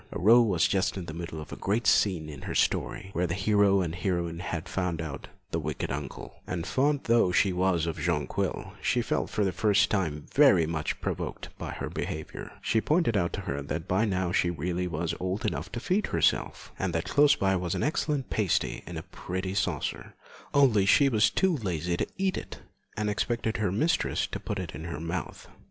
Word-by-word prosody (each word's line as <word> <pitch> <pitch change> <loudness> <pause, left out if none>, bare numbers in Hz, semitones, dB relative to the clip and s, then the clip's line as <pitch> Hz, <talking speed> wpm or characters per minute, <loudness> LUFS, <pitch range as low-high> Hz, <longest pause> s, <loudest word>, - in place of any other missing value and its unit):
Aurore 115 +6 +6
was 90 -6 +3
just 95 0 0
in 90 - -4
the 80 - -7
middle 85 -1 -6
of 75 -3 -8
the - - -6
great 110 +4 -1
scene 90 -7 +3
in 75 -3 -8
her - - -5
story, 95 - 0
where 90 +1 0
the 85 - -2
hero 100 -1 +3
and 85 -3 -2
heroine 85 -2 -2
had 85 -1 -4
found 90 -3 -2
out 75 -4 -5 0.2
the - - 0
wicked - - -3
uncle, 70 -2 -6
and 90 -2 -3
fond 140 +5 +1
though 115 -6 +3
she 95 +1 +3
was 90 -2 +1
of 80 -2 -3
Jonquil, 75 -3 -1
she - - +1
felt - - -1
for 105 - 0
the 95 - +1
first 105 +3 +3
time 80 -8 -1
very 135 - +6
much 80 -1 -2
provoked - - -4
by - - -5
her - - -4
behaviour. 80 0 -5
She 110 - +2
pointed 155 -6 +2
out 85 -4 +1
to - - -3
her 70 +1 -3
that 80 +4 -4
by 95 +5 +2
now 95 -4 0
she 90 - +2
really 90 +2 -2
was 85 0 -2
old 95 +3 -2
enough - - -2
to 120 - -2
feed 185 - 0
herself, - - 0
and 95 -2 -1
that 80 0 -1
close 145 0 +5
by 95 -1 +1
was 90 -2 -1
an - - -1
excellent 150 -2 -1
pasty 100 -6 0
in 85 -1 -6
a 80 - -5
pretty 95 +1 -5
saucer, 100 - -2 0.4
only 125 -9 +4
she 140 +6 +6
was 110 -4 +4
too 190 -3 +2
lazy 90 - -2
to - - -1
eat 190 0 0
it, - - -10 0.4
and 105 0 0
expected 110 +2 -1
her 105 -4 0
mistress 155 - +1
to - - -5
put 105 - -4
it 90 -4 -5
in 80 - -7
her 85 -2 -5
mouth. 85 +3 -5
95 Hz, 210 wpm, -28 LUFS, 85-105 Hz, 0.4 s, Aurore